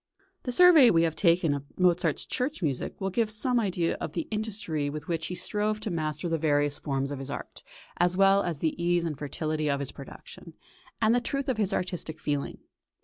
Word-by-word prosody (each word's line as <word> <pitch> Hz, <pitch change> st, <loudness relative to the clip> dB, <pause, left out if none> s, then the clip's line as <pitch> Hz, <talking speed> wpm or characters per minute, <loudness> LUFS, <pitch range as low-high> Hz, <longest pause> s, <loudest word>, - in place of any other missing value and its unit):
The 250 Hz, -, -1 dB
survey 325 Hz, -3 st, +7 dB
we 165 Hz, -1 st, +4 dB
have 165 Hz, -1 st, 0 dB
taken 170 Hz, -4 st, +3 dB
of 140 Hz, -1 st, -4 dB
Mozart's 175 Hz, -3 st, +2 dB
church 260 Hz, -, -2 dB
music 140 Hz, -5 st, -2 dB
will 195 Hz, 0 st, -2 dB
give 225 Hz, +2 st, +1 dB
some 240 Hz, +3 st, +1 dB
idea 180 Hz, -6 st, 0 dB
of 155 Hz, -, -4 dB
the 165 Hz, -, -3 dB
industry 210 Hz, -9 st, -2 dB
with 150 Hz, +1 st, -7 dB
which 165 Hz, -2 st, -2 dB
he 180 Hz, -, -4 dB
strove 210 Hz, +3 st, -1 dB
to 215 Hz, -, -3 dB
master 155 Hz, -1 st, -2 dB
the 165 Hz, -1 st, -1 dB
various 145 Hz, -2 st, +1 dB
forms 135 Hz, -1 st, -2 dB
of 140 Hz, -, -4 dB
his 135 Hz, 0 st, -7 dB
art, 140 Hz, -, -7 dB, 0.4 s
as 175 Hz, +1 st, +2 dB
well 195 Hz, 0 st, +5 dB
as 175 Hz, -5 st, -2 dB
of -, -, -19 dB
the 165 Hz, +1 st, -1 dB
ease 175 Hz, 0 st, +2 dB
and 160 Hz, -3 st, -2 dB
fertility 155 Hz, +2 st, -2 dB
of 140 Hz, -1 st, 0 dB
his 140 Hz, -, -4 dB
production, -, -, -12 dB, 0.5 s
and 220 Hz, +1 st, +4 dB
the 245 Hz, -, +2 dB
truth 275 Hz, +3 st, -3 dB
of 260 Hz, -4 st, 0 dB
his 210 Hz, -2 st, +1 dB
artistic 180 Hz, -4 st, -3 dB
feeling. 145 Hz, -2 st, -2 dB
170 Hz, 210 wpm, -28 LUFS, 150-210 Hz, 0.5 s, survey